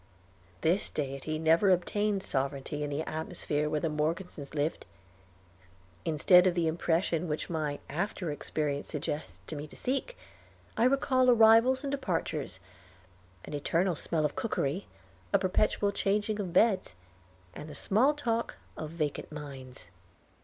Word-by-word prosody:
This 170 +5 +2
Deity 140 +2 -3
never 165 +5 +4
obtained 195 +2 +1
sovereignty 140 +2 -2
in 145 - -2
the 145 +2 -2
atmosphere 150 -1 -2
where 150 -1 -1
the - - +1
Morgesons 155 -1 -3
lived. 150 - -1 1.2
Instead 180 +4 +5
of 180 - +1
the 170 -2 +1
impression 165 +1 0
which 155 +2 -3
my 150 -3 -1
after 175 +1 -2
experience 145 0 -2
suggests 150 0 -4
to 155 - -5
me 150 +1 -6
to - - -15
seek, 275 - -2 0.6
I 230 - +3
recall 255 -1 +3
arrivals 235 +3 +6
and 280 - -2
departures, 205 -12 -2 0.9
an - - -8
eternal 170 +5 +1
smell 160 0 -1
of 150 - -1
cookery, 190 -5 -1 0.5
a - - +7
perpetual 200 +2 +1
changing 205 +2 0
of 190 -4 -3
beds, 195 - +3 0.6
and 150 - -8
the 150 - -8
small 250 - +3
talk 235 -5 -1 0.2
of 155 - -5
vacant 155 -3 -3
minds. 135 - -8
165 Hz, 140 wpm, -30 LUFS, 150-205 Hz, 1.2 s, a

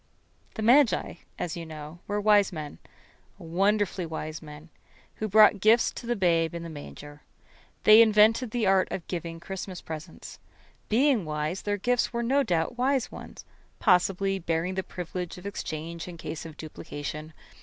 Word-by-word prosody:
The 220 - -3
magi, 250 +2 +4 0.2
as 170 - -3
you 170 - -6
know, 155 +1 -9
were 205 0 -1
wise 205 -1 +4
men 155 -4 -7 0.6
wonderfully 190 +1 0
wise 155 -1 -5
men 150 +1 -12 0.5
who 215 - -2
brought 215 0 +6
gifts 220 +4 +4
to 235 - -9
the 240 - +1
Babe 170 -4 +1
in 170 - -5
the 165 - -7
manger. 145 0 -10 0.6
They 215 +1 +9
invented 220 +2 +4
the 230 -1 -1
art 190 -1 +3
of 180 - -4
giving 170 -2 -5
Christmas 185 0 -6
presents. 155 -1 -9 0.5
Being 250 -1 +3
wise, 155 +3 -3
their 205 0 -1
gifts 245 +4 +1
were 235 -1 -2
no 270 +4 +2
doubt 180 +2 -1
wise 265 0 +1
ones, - - -10 0.3
possibly 195 0 +2
bearing 165 +1 -1
the 190 - -1
privilege 180 -1 -6
of 180 - -12
exchange 165 -4 -5
in 175 -1 -8
case 165 0 -6
of 155 - -12
duplication. 155 0 -7
180 Hz, 160 wpm, -27 LUFS, 160-215 Hz, 0.6 s, They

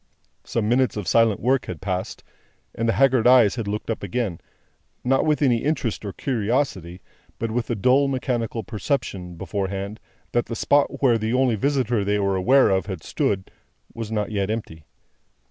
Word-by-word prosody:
Some 110 -3 -2
minutes 120 -2 +2
of 100 -4 -4
silent 115 0 +3
work 130 +2 +1
had 90 -4 -6
passed: 95 -2 -4 0.5
and 115 0 -1
the - - +3
haggard 130 -4 +3
eyes 125 -5 +6
had 115 -4 -4
looked 105 +2 -3
up 115 - -4
again: 100 -3 -2 0.6
not 135 +4 +2
with 150 -1 +2
any 125 -4 +4
interest 130 -6 -2
or 100 - -4
curiosity, 105 - -2 0.4
but 115 -1 -3
with 120 +1 -2
a 120 - 0
dull 130 +7 +3
mechanical 120 -4 -2
perception, 105 -5 -3
beforehand, 100 +3 -4 0.3
that 120 - 0
the 115 - -4
spot 145 +3 +1
where 120 -4 +4
the 110 +2 -1
only 130 -2 +3
visitor 125 -2 0
they 100 +1 +1
were 100 -1 +1
aware 130 +9 +4
of 95 -1 0
had 95 -6 -6
stood, 95 -1 -1 0.4
was 115 -2 -6
not 105 -1 -1
yet 100 -2 -1
empty. 80 -9 -5
115 Hz, 175 wpm, -23 LUFS, 100-125 Hz, 0.6 s, eyes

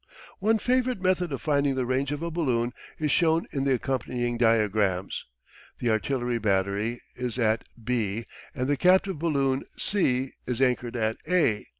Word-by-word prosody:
One 220 +3 +3
favourite 250 +1 +1
method 185 -2 +1
of 135 -5 -4
finding 140 -2 +2
the 130 -1 0
range 130 +3 0
of 145 +2 -3
a 170 - -2
balloon 125 -7 0 0.2
is 150 -2 0
shown 165 0 +3
in 135 -2 -1
the 135 -1 +3
accompanying 120 -1 -2
diagrams. 105 -5 +1 0.5
The 120 - 0
artillery 120 +1 0
battery 100 +3 0
is 125 -1 -3
at 110 -2 +1 0.2
B 115 -2 -1 0.3
and 130 -2 -1
the 145 0 +1
captive 185 +1 +3
balloon, 140 -5 +1
C, 135 -10 +1 0.2
is 125 -1 -1
anchored 125 -2 +1
at 110 -1 0
A. 160 -13 +2
130 Hz, 160 wpm, -27 LUFS, 115-155 Hz, 0.5 s, One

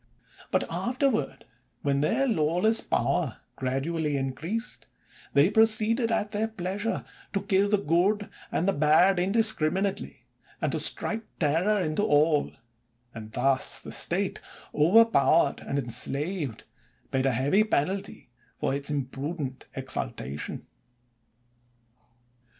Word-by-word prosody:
But - - +1
afterward, 255 -1 -1 0.4
when 140 -1 +1
their 230 - +2
lawless 180 +3 +2
power - - -1 0.2
gradually 145 +3 -1
increased, 160 - -4 0.5
they 145 +7 +5
pro 220 +1 +6
ceeded, 225 +2 0
at 215 -2 0
their 215 +2 0
pleasure, 205 +1 -3 0.3
to 200 - -1
kill 200 0 +2
the 210 - +3
good 200 +4 +1 0.2
and 180 -2 0
bad 175 +5 +5
indiscriminately, 195 -2 +1 0.3
and - - -1
to - - -1
strike 225 - -1 0.2
terror 170 +7 +2
into 155 +3 -1
all; 150 -4 +3 0.6
and 110 -1 -9
thus 130 +3 +2
the - - -9
State, - - -1 0.3
overpowered 165 -4 +4
and 140 - -4
en 125 -4 -3
slaved, 140 - -3 0.5
paid 135 0 +1
a - - +3
heavy 140 - +2
penalty 195 0 -2 0.3
for - - -1
its 140 +1 -2
imprudent 140 0 -4
exultation. 70 +4 -3
170 Hz, 115 wpm, -27 LUFS, 140-210 Hz, 0.6 s, pro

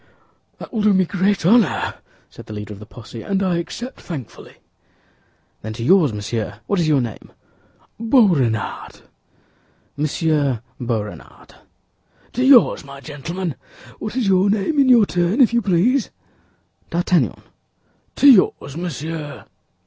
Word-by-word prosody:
"That - - -11
will 220 - -1
do 210 -1 +4
me 185 0 +3
great 195 0 0
honor," 220 +2 +3 0.3
said - - -14
the 110 - -8
leader 105 0 -7
of 100 - -12
the 105 - -12
posse, 115 -1 -10
"and 195 - -1
I 180 -2 +1
accept 240 +9 -7
thankfully." 145 -9 -9 1.1
"Then 110 +1 -6
to 115 +1 -6
yours, 165 -1 +4
monsieur—what 105 - -3
is 165 - +1
your 145 -3 +3
name?" 115 -4 -7 0.7
"Boisrenard." 180 - +1 0.9
"Monsieur 150 - 0 0.2
Boisrenard." 115 -4 -6 0.8
"To 250 - 0
yours, 260 -3 +5
my 140 0 -11
gentlemen! 165 +4 -5 0.5
What 215 +2 -5
is 250 -5 0
your 190 +1 +3
name, 215 +9 0
in 270 -2 +4
your 235 -4 +6
turn, 175 +6 0
if 240 -3 +5
you 235 - +3
please?" 210 +6 +1 0.8
"D'Artagnan." 175 +1 0 0.8
"To 285 - +4
yours, 185 - +4
monsieur." 160 -3 -6
170 Hz, 135 wpm, -20 LUFS, 135-205 Hz, 1.1 s, your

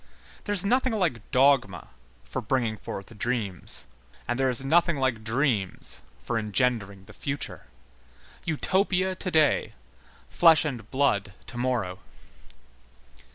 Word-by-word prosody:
There 205 - -1
is 200 -1 +5
nothing 255 +3 +2
like 165 - -1
dogma 130 -8 +3 0.3
for - - -4
bringing 115 -1 0
forth 100 +2 -8
dreams. 110 -7 -2 0.4
And 120 +2 -1
there 135 0 +3
is 130 +2 +1
nothing 170 +2 +3
like 130 -5 0
dreams 110 -4 -1 0.2
for 115 -2 -2
engendering 105 -3 0
the - - -14
future. 140 0 -5 0.8
Utopia 185 +3 +1
to 185 0 -4
day, 155 -4 +2 0.5
flesh 160 -3 +5
and 120 -7 -5
blood 110 -8 +1
to 135 - -11
morrow. 115 -8 -1
130 Hz, 120 wpm, -27 LUFS, 110-160 Hz, 0.8 s, is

